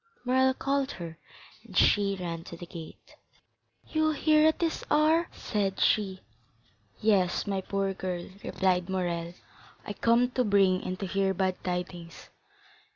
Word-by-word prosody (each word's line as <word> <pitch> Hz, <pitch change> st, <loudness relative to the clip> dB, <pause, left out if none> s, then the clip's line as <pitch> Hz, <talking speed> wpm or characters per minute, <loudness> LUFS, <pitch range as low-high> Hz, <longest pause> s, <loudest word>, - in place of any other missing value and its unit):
Morrel 260 Hz, +1 st, +3 dB
called 275 Hz, 0 st, -1 dB
her, 165 Hz, -2 st, -8 dB, 0.4 s
and -, -, -8 dB
she 200 Hz, -1 st, +4 dB
ran 165 Hz, -2 st, -4 dB
to 170 Hz, -, -9 dB
the 175 Hz, -, -8 dB
gate. 165 Hz, -2 st, -11 dB, 0.7 s
"You 315 Hz, 0 st, +1 dB
here 305 Hz, +1 st, +4 dB
at 315 Hz, -, +2 dB
this 330 Hz, -2 st, -1 dB
hour?" 315 Hz, +3 st, +3 dB
said 195 Hz, -2 st, -2 dB
she. 190 Hz, -3 st, +1 dB, 0.8 s
"Yes, 195 Hz, -5 st, +2 dB
my 195 Hz, -2 st, -1 dB
poor 195 Hz, 0 st, -1 dB
girl," 180 Hz, -2 st, -4 dB, 0.2 s
replied 185 Hz, -1 st, 0 dB
Morrel; 175 Hz, -2 st, -2 dB, 0.5 s
"I 205 Hz, -, -4 dB
come 235 Hz, +3 st, +2 dB
to 250 Hz, -, +1 dB
bring 195 Hz, -4 st, +3 dB
and 185 Hz, 0 st, -4 dB
to -, -, -1 dB
hear 195 Hz, +1 st, 0 dB
bad 185 Hz, 0 st, -1 dB
tidings." 180 Hz, -2 st, -5 dB
195 Hz, 145 wpm, -28 LUFS, 180-245 Hz, 0.8 s, she